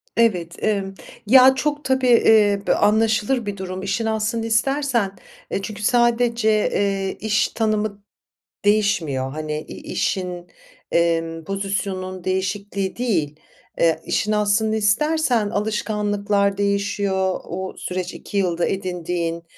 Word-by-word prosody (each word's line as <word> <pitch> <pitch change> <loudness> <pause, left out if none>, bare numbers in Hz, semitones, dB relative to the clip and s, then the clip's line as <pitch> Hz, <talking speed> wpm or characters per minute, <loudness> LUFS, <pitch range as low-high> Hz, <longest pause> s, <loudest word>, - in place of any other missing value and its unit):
Evet, 180 -8 +1
emm. 195 -3 0 0.3
Ya, 260 +3 +7
çok 295 +2 -1
tabii, 260 -1 +1
eee, 215 -4 +5
bö - - +4
anlaşılır 220 +3 +2
bir 200 -1 -4
durum, 185 0 -5
işin 195 +4 -1
aslını 220 +1 -1
istersen. 235 -2 +1 0.4
Eee, - - -1
çünkü 210 +1 -6
sadece, 235 -1 +2
eee, 200 -2 0
iş 210 -1 +1
tanımı 215 -2 -1 0.6
değişmiyor, 165 -11 +1
hani, 155 0 -4
i - - -9
işin, 180 -2 -2 0.4
emm, 165 -1 0
pozisyonun 195 -1 -3
değişikliği 190 +1 -2
değil. 170 -12 -1 0.4
Eee, 165 -1 +3
işin 215 - 0
aslını 210 +1 +2
istersen, 230 +1 +1
alışkanlıklar 205 -1 0
değişiyor, 200 -2 0
o 190 +2 -5
süreç 180 0 -4
2 200 - -6
yılda 175 -3 +1
edindiğin. 175 -3 -3
205 Hz, 115 wpm, -21 LUFS, 185-220 Hz, 0.6 s, Ya